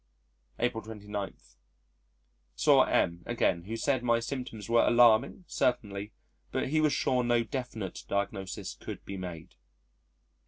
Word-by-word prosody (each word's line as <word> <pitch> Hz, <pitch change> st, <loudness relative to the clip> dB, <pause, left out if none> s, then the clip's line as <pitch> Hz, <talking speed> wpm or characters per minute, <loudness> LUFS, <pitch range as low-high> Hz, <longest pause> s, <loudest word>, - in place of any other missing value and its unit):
April 120 Hz, -2 st, 0 dB
29. 105 Hz, -2 st, -5 dB, 1.2 s
Saw -, -, +5 dB
M 85 Hz, 0 st, +1 dB
again, 90 Hz, -7 st, +1 dB
who 115 Hz, +3 st, -4 dB
said 130 Hz, 0 st, +1 dB
my 120 Hz, -1 st, +2 dB
symptoms 115 Hz, -3 st, -5 dB
were 115 Hz, 0 st, +4 dB
alarming 120 Hz, -, +5 dB
certainly, 105 Hz, -4 st, -1 dB, 0.4 s
but -, -, -1 dB
he 155 Hz, +2 st, +2 dB
was 155 Hz, -1 st, +3 dB
sure 125 Hz, -2 st, +1 dB
no 120 Hz, -1 st, +2 dB
definite 115 Hz, -6 st, -5 dB
diagnosis 100 Hz, -1 st, -3 dB
could -, -, -8 dB
be 100 Hz, -, -6 dB
made. 90 Hz, -4 st, -7 dB
115 Hz, 125 wpm, -30 LUFS, 100-125 Hz, 1.2 s, Saw